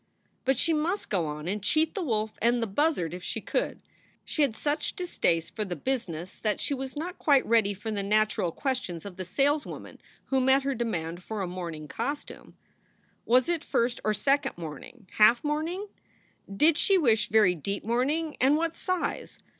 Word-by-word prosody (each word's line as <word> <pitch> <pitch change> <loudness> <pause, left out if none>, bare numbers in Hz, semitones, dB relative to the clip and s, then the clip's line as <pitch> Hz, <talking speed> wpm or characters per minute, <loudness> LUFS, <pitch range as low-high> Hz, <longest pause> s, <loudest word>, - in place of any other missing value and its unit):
But 265 -1 +2
she 330 +5 +3
must 330 +6 -1
go 175 -6 +1
on 150 +2 -5
and 205 +3 -2
cheat 310 +10 +2
the 400 - -3
wolf 220 -8 -1
and 240 +1 +3
the 230 - 0
buzzard 200 - 0
if 180 - -6
she - - -3
could. - - -2 0.5
She 310 - -1
had 270 -7 +2
such 295 +5 -1
distaste 170 - -1
for 215 - -1
the 185 -3 -4
business 180 - -3
that 210 -2 -1
she - - 0
was 265 +1 -5
not 350 +4 -5
quite 280 -3 +4
ready 220 -3 +3
for 220 +3 -5
the 205 -2 -2
natural 210 -3 +1
questions 250 - -3
of 195 -3 -8
the 185 - -5
sales 285 - +1
woman - - -9 0.3
who 265 -1 +1
met 265 +1 +4
her 275 0 0
demand 175 -8 -3
for 210 +1 -4
a - - -2
mourning 170 -4 -6
costume. 275 - -5 0.7
Was 250 +4 +4
it 340 -2 0
first 240 -3 0
or 215 0 +1
second 275 -1 +1
mourning, 170 - -9
half 225 +3 +6
mourning? 315 +6 -2 0.7
Did 300 +11 +4
she 390 - +5
wish 225 - +3
very 210 -4 +5
deep 200 +5 -4
mourning, 285 +8 0
and 275 +4 +5
what 330 0 -1
size? 370 -2 -2
235 Hz, 185 wpm, -28 LUFS, 195-295 Hz, 0.7 s, half